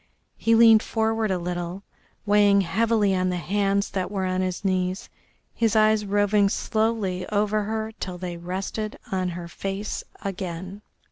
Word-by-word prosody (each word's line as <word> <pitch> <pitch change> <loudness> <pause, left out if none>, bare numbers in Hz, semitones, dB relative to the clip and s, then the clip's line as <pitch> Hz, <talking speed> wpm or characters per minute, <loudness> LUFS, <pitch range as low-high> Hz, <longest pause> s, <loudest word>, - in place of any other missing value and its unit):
He 230 0 +2
leaned 225 -1 +7
forward 225 -1 0
a 190 - +1
little, 175 +2 -4 0.4
weighing 205 -1 +5
heavily 210 +2 +2
on 185 0 +1
the 180 - -1
hands 200 +3 0
that 185 -2 -2
were 195 -2 -2
on 185 0 0
his 185 +2 -3
knees, 185 0 -1 0.4
his 225 -2 +1
eyes 215 -1 +3
roving 205 0 +3
slowly 215 -5 -1
over 210 0 +1
her 220 +1 -3
till 180 -1 -5
they 175 -1 -5
rested 190 +5 -4
on 185 -1 0
her 175 0 -6
face 195 +4 -4 0.2
again. 190 0 -5
195 Hz, 150 wpm, -25 LUFS, 185-215 Hz, 0.4 s, leaned